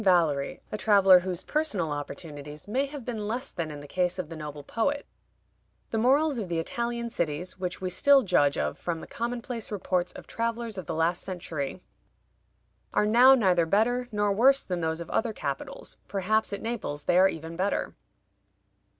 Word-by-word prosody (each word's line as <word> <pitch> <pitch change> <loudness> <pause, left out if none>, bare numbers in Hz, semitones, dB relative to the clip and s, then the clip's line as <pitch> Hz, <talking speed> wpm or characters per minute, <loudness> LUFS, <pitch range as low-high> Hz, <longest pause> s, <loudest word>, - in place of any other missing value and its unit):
Valery, 165 -7 +2
a 215 - -3
traveler 195 -4 +7
whose 180 0 -4
personal 220 - -1
opportunities 145 +1 -7
may 265 +7 0
have 280 -4 -8
been 220 -4 -3
less 245 +5 -2
than 165 -2 -3
in 145 -1 -7
the 145 - -10
case 180 +2 0
of 180 -4 -4
the 165 - -7
noble 150 -2 -7
poet: 285 - -1 0.9
"The 225 - 0
morals 275 +3 +3
of 195 -5 -4
the 170 - -1
Italian 235 +7 -2
cities, 170 +2 -3
which 180 0 -4
we 185 -1 -2
still 280 +7 +5
judge 145 -8 +3
of - - -2
from 170 -2 -3
the - - -8
commonplace 235 -1 -4
reports 185 -3 -1
of - - -10
travelers 230 -2 -3
of 175 - -8
the 160 - -2
last 165 +2 +1
century, 170 -3 -5 1.1
are - - +4
now 245 +5 +7
neither 180 -8 +3
better 245 +7 +2
nor 205 -1 +1
worse 270 +6 +5
than 180 -2 -3
those 160 +1 -1
of 170 - -7
other 225 0 0
capitals; 140 -8 -5
perhaps 205 +3 0
at 200 - -5
Naples 215 -11 -3
they 175 - +3
are 190 +1 +6
even 160 -1 -6
better." 190 +3 -1
190 Hz, 180 wpm, -28 LUFS, 165-230 Hz, 1.1 s, traveler